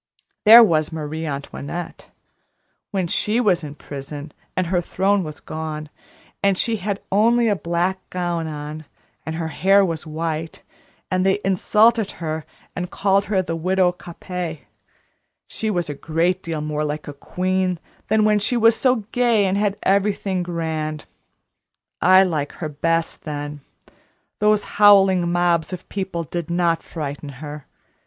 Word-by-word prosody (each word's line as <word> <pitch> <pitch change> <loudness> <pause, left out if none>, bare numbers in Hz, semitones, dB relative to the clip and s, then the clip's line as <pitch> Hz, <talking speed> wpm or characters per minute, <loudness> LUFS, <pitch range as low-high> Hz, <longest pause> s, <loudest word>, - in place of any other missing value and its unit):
There 230 +3 +11
was 155 -7 +2
Marie 160 0 -4
Antoinette; 145 +4 -6 0.8
when 190 -3 -1
she 210 +6 0
was 195 -8 +2
in 145 -1 -7
prison, 145 +1 -8 0.3
and 185 - +2
her 175 +1 +1
throne 195 +3 +1
was 155 -2 -7
gone, 155 -1 -6 0.5
and 200 -1 +2
she 225 +2 +1
had 200 0 -3
only 230 +4 +4
a 210 - +3
black 175 +2 -1
gown 175 -2 -2
on, 150 0 -6 0.4
and 160 - -3
her 160 -1 -3
hair 195 +4 +4
was 165 -2 -4
white, 160 0 -4 0.5
and 185 0 +2
they 190 +1 +3
insulted 210 +3 +3
her 160 -2 -4 0.3
and 180 0 -3
called 195 +1 +1
her 190 -3 +1
the 165 -2 -3
Widow 185 +2 +2
Capet, 175 -2 -6 0.8
she 220 - -3
was 175 -4 -1
a 145 - -3
great 165 +5 0
deal 165 -3 -4
more 150 0 -2
like 150 0 -4
a 145 - -6
queen 185 +5 -1 0.3
then 220 0 +3
than - - +3
when 210 -1 +4
she 240 +4 0
was 230 0 +5
so 250 -3 +2
gay 235 -4 +3
and 190 0 +1
had 205 0 0
everything 195 -1 +1
grand. 160 -3 -3 1.0
I 185 +1 +7
like 155 -6 -2
her 155 - -5
best 165 +3 -1
then. 145 -1 -5 0.8
Those 210 0 +3 0.2
howling 190 -4 +6
mobs 175 -1 +1
of 185 -1 -7
people 190 -4 -3
did 170 +1 -5
not 170 -1 +1
frighten 145 -2 -6
her. 150 0 -8
175 Hz, 150 wpm, -22 LUFS, 155-195 Hz, 1.0 s, There